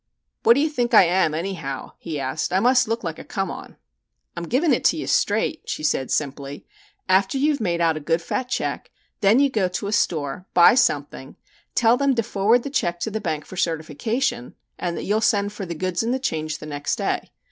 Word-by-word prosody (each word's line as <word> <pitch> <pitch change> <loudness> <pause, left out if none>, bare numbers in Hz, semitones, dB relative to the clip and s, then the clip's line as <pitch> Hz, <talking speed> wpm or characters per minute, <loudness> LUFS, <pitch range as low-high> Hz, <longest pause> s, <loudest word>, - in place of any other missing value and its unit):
"What 230 - +6
do 280 - +2
you 310 - +1
think 245 -5 0
I - - +9
am, 175 -3 +2
anyhow?" 165 -6 -4
he 160 -4 -5
asked. 135 +3 -2
"I 185 - +3
must 250 +2 +4
look 230 +1 -2
like 165 -2 -4
a - - -8
'come 195 -4 -3
on.'" - - -10 0.6
"I'm 170 - -5
giving 280 - +2
it - - 0
to - - +4
you - - -4
straight," 320 - +1
she - - -3
said 140 -4 0
simply. 140 -1 -3 0.4
"After 190 +6 +2
you 295 +3 +3
have 280 - -3
made 170 -4 0
out 165 -2 +2
a - - -3
good 165 +3 0
fat 250 +9 -3
check, - - -3 0.3
then 210 +5 +4
you 280 -1 +3
go 210 -6 +1
to 180 +3 -4
a 200 - -3
store, 160 -3 -1
buy 175 - +8
something, 145 - 0 0.4
tell 235 +1 +4
them 275 -1 +2
to 230 - +1
forward 220 +3 +2
the 280 - -5
check 175 -10 -1
to 220 - -2
the 220 +1 -3
bank 155 -7 -3
for 185 - -11
certification, 165 - -2 0.2
and 175 -1 -2
that - - -4
you'll 210 +2 0
send 205 -2 +1
for 200 -3 -6
the 170 - -5
goods 185 +2 -1
and 235 +3 0
the - - 0
change 155 - -3
the - - -10
next 145 -1 -2
day. - - -2
190 Hz, 225 wpm, -23 LUFS, 155-235 Hz, 0.6 s, I